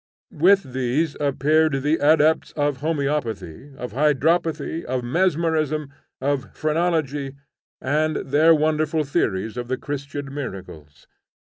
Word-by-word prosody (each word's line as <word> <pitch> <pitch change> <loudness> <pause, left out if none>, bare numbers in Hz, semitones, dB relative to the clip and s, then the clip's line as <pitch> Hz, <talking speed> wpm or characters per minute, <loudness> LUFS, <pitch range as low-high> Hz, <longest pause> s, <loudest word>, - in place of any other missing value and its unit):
With 175 -4 +3
these 130 +5 0
appeared 145 0 +2
the 150 +2 +2
adepts 155 +1 +3
of 145 -2 0
homoeopathy, 140 - -3
of 125 - -6
hydropathy, 155 +3 +1
of 125 0 -3
mesmerism, 155 -1 0 0.3
of 135 0 -2
phrenology, 155 -4 -1 0.4
and 155 +3 0
their 155 +4 +4
wonderful 155 0 +1
theories 110 -5 -1
of 120 -1 -4
the 130 +1 -2
Christian 140 0 -6
miracles! 95 - -8
145 Hz, 110 wpm, -23 LUFS, 130-155 Hz, 0.4 s, their